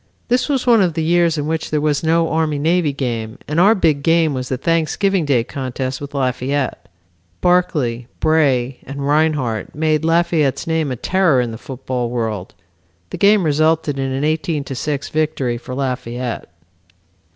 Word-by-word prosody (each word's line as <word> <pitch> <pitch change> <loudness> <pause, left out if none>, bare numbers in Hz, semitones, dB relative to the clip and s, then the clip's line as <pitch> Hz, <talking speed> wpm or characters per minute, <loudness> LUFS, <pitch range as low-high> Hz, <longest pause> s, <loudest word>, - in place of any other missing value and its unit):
This 250 +4 +1
was 270 -3 0
one 235 -4 +5
of 175 -4 +1
the 160 - 0
years 170 0 +2
in 145 - -2
which 160 +1 -2
there 155 - 0
was 150 -1 0
no 165 +1 +2
Army 160 -2 +1
and 145 - -3
Navy 165 -2 +2
game 120 -4 -4
and 150 +3 0
our 205 +5 +6
big 155 -7 +2
game 165 0 +3
was 130 -1 -4
the 130 - -1
Thanksgiving 165 +4 +1
Day 130 -5 +2
contest 130 0 -4
with 145 0 -7
Lafayette. 130 +1 -2 0.5
Barclay, 145 -10 +1
Bray 135 -5 +2
and 140 +1 -7
Rinehart 145 -8 0
made 155 0 +1
Lafayette's 165 -4 +1
name 160 -3 0
a - - -2
terror 180 0 +2
in 120 -2 -1
the 110 - -7
football 125 -2 -4
world. 110 -6 -3 0.6
The - - -6
game 205 -1 +5
resulted 155 -1 +1
in 135 0 -1
an 135 +2 -2
18 155 -1 0
to 135 - -6
6 140 +2 -3
victory 150 -6 -1
for 125 +1 -7
Lafayette. 125 -4 -4
150 Hz, 175 wpm, -19 LUFS, 130-160 Hz, 0.6 s, our